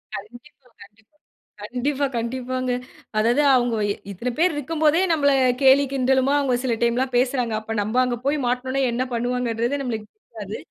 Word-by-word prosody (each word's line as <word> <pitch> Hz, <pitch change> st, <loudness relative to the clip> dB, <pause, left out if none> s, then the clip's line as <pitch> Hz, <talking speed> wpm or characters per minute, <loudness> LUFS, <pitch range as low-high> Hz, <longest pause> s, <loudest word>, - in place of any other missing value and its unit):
கண்டிப்பா, 240 Hz, +6 st, -12 dB, 0.2 s
கண்டிப்பா. 210 Hz, +8 st, -23 dB, 0.5 s
கண்டிப்பா, 265 Hz, +6 st, -1 dB
கண்டிப்பாங்க. 255 Hz, +2 st, -3 dB, 0.5 s
அதாவது 235 Hz, +6 st, +3 dB
அவுங்க 240 Hz, -2 st, +1 dB, 0.4 s
இத்தன 235 Hz, +6 st, -4 dB
பேர் 350 Hz, +1 st, +3 dB
இருக்கும் 300 Hz, +2 st, -4 dB
போதே 310 Hz, +3 st, +4 dB
நம்மள 285 Hz, -3 st, +3 dB, 0.3 s
கேலி, 270 Hz, +1 st, +6 dB
கிண்டலுமா 265 Hz, +1 st, +2 dB
அவுங்க 270 Hz, -3 st, +1 dB
சில 245 Hz, -3 st, 0 dB
டைம்லாம் 250 Hz, +2 st, 0 dB
பேசுறாங்க. 250 Hz, -2 st, 0 dB
அப்ப 225 Hz, 0 st, -5 dB
நம்ம 215 Hz, +5 st, 0 dB
அங்க 250 Hz, -1 st, -1 dB
போய் 285 Hz, +2 st, +1 dB
மாட்டுனோம்னா 260 Hz, +2 st, -1 dB
என்ன 240 Hz, +2 st, -1 dB
பண்ணுவாங்கன்றது 240 Hz, +2 st, -1 dB
நம்மளுக்கு 225 Hz, -5 st, -4 dB, 0.3 s
தெரியாது. -, -, -5 dB
250 Hz, 145 wpm, -23 LUFS, 235-275 Hz, 0.5 s, கேலி